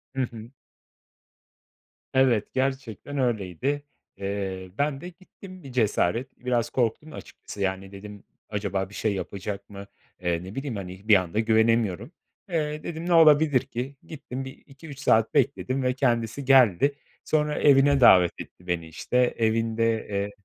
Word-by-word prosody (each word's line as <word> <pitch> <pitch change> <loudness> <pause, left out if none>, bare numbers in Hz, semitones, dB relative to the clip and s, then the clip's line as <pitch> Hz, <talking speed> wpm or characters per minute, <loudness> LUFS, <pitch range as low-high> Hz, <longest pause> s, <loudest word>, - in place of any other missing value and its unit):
Hı 135 - 0
hı. 115 -2 -5 1.6
Evet, 130 -5 +2
gerçekten 130 0 -3
öyleydi. 125 - -1 0.3
Eee, 95 -2 -4
ben 145 -1 -1
de 175 - -7
gittim 185 0 -14
bir 135 - -10
cesaret. 115 +1 0
Biraz 120 -2 0
korktum 130 +5 -1
açıkçası, 100 - -10
yani, 95 0 -2
dedim; 100 +1 -11 0.3
acaba 100 -2 -2
bir - - -16
şey 110 -2 0
yapacak 100 +2 -6
mı? 100 0 -10 0.3
Eee, 85 -1 -1
ne 95 +3 -9
bileyim 135 -3 -4
hani, 95 +1 -8
bir 105 - +7
anda 90 +3 0
güvenemiyorum. 110 - +1 0.4
Eee, 155 -2 -2
dedim 165 0 -5
ne 175 - +1
olabilir 150 -4 +6
ki? 135 +1 -6
Gittim, 135 -4 -7
1-2-3 140 +2 -12
saat 110 -4 +2
bekledim 135 -1 0
ve 125 0 +1
kendisi 120 0 -1
geldi. 135 0 +5 0.3
Sonra 150 -1 0
evine 140 -1 +5
davet 90 -7 +7
etti 90 - -14
beni, 85 -2 -2
işte 80 +9 -3 0.2
evinde 115 0 0
eee 100 0 -2
115 Hz, 140 wpm, -25 LUFS, 100-135 Hz, 1.6 s, bir